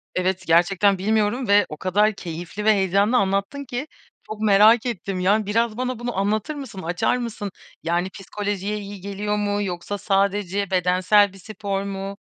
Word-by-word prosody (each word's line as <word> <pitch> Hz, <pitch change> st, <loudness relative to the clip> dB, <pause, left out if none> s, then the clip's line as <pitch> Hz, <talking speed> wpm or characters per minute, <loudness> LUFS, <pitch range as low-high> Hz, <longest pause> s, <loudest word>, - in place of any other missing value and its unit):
Evet, 185 Hz, 0 st, 0 dB
gerçekten 185 Hz, +4 st, +4 dB
bilmiyorum 215 Hz, +5 st, 0 dB
ve 205 Hz, -1 st, +5 dB
o 155 Hz, -, -7 dB
kadar 205 Hz, +5 st, +2 dB
keyifli 175 Hz, +3 st, -6 dB
ve 220 Hz, -, +6 dB
heyecanlı 200 Hz, +4 st, +2 dB
anlattın 200 Hz, +8 st, -1 dB
ki 250 Hz, +3 st, -4 dB, 0.4 s
çok 215 Hz, 0 st, -7 dB
merak 215 Hz, +3 st, +5 dB
ettim. 195 Hz, -5 st, -3 dB
Yani, 205 Hz, +4 st, +2 dB
biraz 225 Hz, +2 st, 0 dB
bana 255 Hz, -1 st, -2 dB
bunu 240 Hz, -3 st, -4 dB
anlatır 210 Hz, +8 st, 0 dB
mısın, 265 Hz, -9 st, -7 dB
açar 175 Hz, +8 st, 0 dB
mısın? 225 Hz, -4 st, -5 dB, 0.3 s
Yani, 175 Hz, +3 st, 0 dB
psikolojiye 205 Hz, +1 st, -4 dB
iyi 200 Hz, -1 st, -8 dB
geliyor 205 Hz, +2 st, -3 dB
mu 205 Hz, 0 st, 0 dB
yoksa 185 Hz, +1 st, -4 dB
sadece 200 Hz, 0 st, 0 dB
bedensel 185 Hz, +2 st, +3 dB
bir -, -, -13 dB
spor 200 Hz, -1 st, -4 dB
mu? 195 Hz, 0 st, -5 dB
200 Hz, 160 wpm, -23 LUFS, 190-215 Hz, 0.4 s, ve